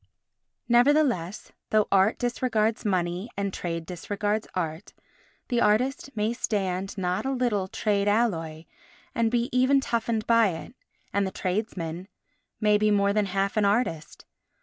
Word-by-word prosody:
Nevertheless, 240 - +2 0.2
though 215 -1 +3
art 195 +2 +4
disregards 235 -3 0
money 185 0 -1
and 200 -1 -2
trade 165 -2 -4
disregards 205 +4 -2
art, 165 0 -4 0.6
the 240 -2 +1
artist 250 +7 +1
may 215 +2 +1
stand 195 -5 -2
not 180 -1 -1
a 265 - -1
little 240 -7 0
trade 200 0 0
alloy 165 -8 0 0.5
and 230 -1 +1
be 240 0 +1
even 260 +2 +4
toughened 230 -4 -1
by 230 -2 +5
it, 165 +8 -8 0.4
and 200 0 +1
the - - -4
tradesmen 185 -3 -3 0.5
may 210 -1 +3
be 215 0 +3
more 200 -1 +3
than 210 -1 +1
half 195 +2 -1
an 210 - +3
artist. 200 -7 -1
210 Hz, 140 wpm, -26 LUFS, 185-230 Hz, 0.6 s, by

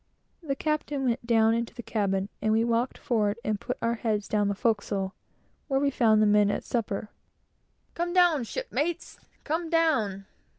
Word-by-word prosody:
The 285 -5 -2
captain 295 -1 -2
went 235 -1 -1
down 225 -1 +4
into 230 0 -2
the 240 - -7
cabin, 195 -3 -1
and 215 - +1
we 220 +1 +3
walked 235 +2 0
forward 210 -3 0
and 215 -2 -1
put 250 - -4
our 230 - +2
heads 215 -3 -1
down 210 -1 +1
the 200 - -1
forecastle, 200 -3 -1 0.5
where 270 -2 +1
we 280 0 +1
found 220 -4 +4
the - - +5
men 205 -1 +4
at - - -2
supper, 215 -3 -2 0.8
"Come 345 +1 -2
down, 350 -6 +4
shipmates! 345 - -3 0.2
Come 325 +2 -2
down!" 260 - +1
230 Hz, 170 wpm, -27 LUFS, 210-285 Hz, 0.8 s, the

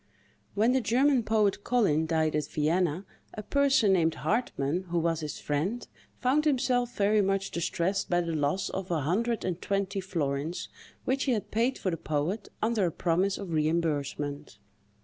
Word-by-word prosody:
When 220 +4 +3
the 260 0 +2
German 255 +4 +3
poet 210 -2 +1
Collin 180 -11 +2
died 160 -1 +1
at 150 - -1
Vienna, 170 +3 0 0.3
a 215 - -6
person 275 -6 +3
named 165 -3 +2
Hartmann, 185 - -1
who 175 - -1
was 165 -1 +1
his 150 -2 -5
friend, 175 +12 -2 0.3
found 275 +5 +2
himself 250 -4 +1
very 210 +1 +3
much 195 0 0
distressed 180 +3 -1
by 175 0 +2
the 170 -1 -3
loss 155 +5 0
of 190 -1 -4
a 165 -3 0
hundred 225 - 0
and 180 -1 -3
twenty 195 0 -1
florins, 160 -3 -3 0.4
which 265 +1 0
he 260 - +2
had 215 - -3
paid 235 +4 +1
for 185 - -2
the 165 - -2
poet, 155 +8 -2
under 220 -4 +2
a - - -2
promise 185 +4 0
of 195 -4 -6
reimbursement. 150 -4 -1
190 Hz, 170 wpm, -28 LUFS, 160-225 Hz, 0.4 s, When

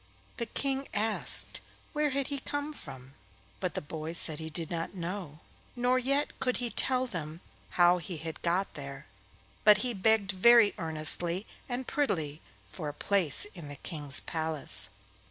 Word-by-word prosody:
The 235 - -3
King 275 +3 -2
asked 215 +1 +2 0.3
where 300 -1 +1
he 275 0 0
had 280 0 -5
come 290 +1 -3
from, 135 - -11 0.5
but 185 -2 -3
the - - -2
boy 155 +2 -6
said 160 -2 +3
he 160 0 -5
did 160 +1 -1
not 165 +3 -4
know, 175 -3 -5 0.3
nor 250 +1 +2
yet 275 +3 -1
could 250 -1 0
he 245 -2 -2
tell 255 +4 +2
them 165 -8 -6 0.4
how 175 0 +6
he 170 +1 -6
had 160 +1 -6
got 180 +3 0
there, 140 -1 -8 0.6
but 210 -2 +8
he 245 - -1
begged 205 -1 +3
very 225 +3 +6
earnestly 165 +3 +2 0.2
and 250 +1 -3
prettily 160 - -1 0.2
for 145 +10 -6
a 145 - -8
place 185 -4 +3
in 170 -5 -9
the 145 - -7
King's 145 -2 -2
palace. 160 -3 0
180 Hz, 160 wpm, -30 LUFS, 155-240 Hz, 0.6 s, but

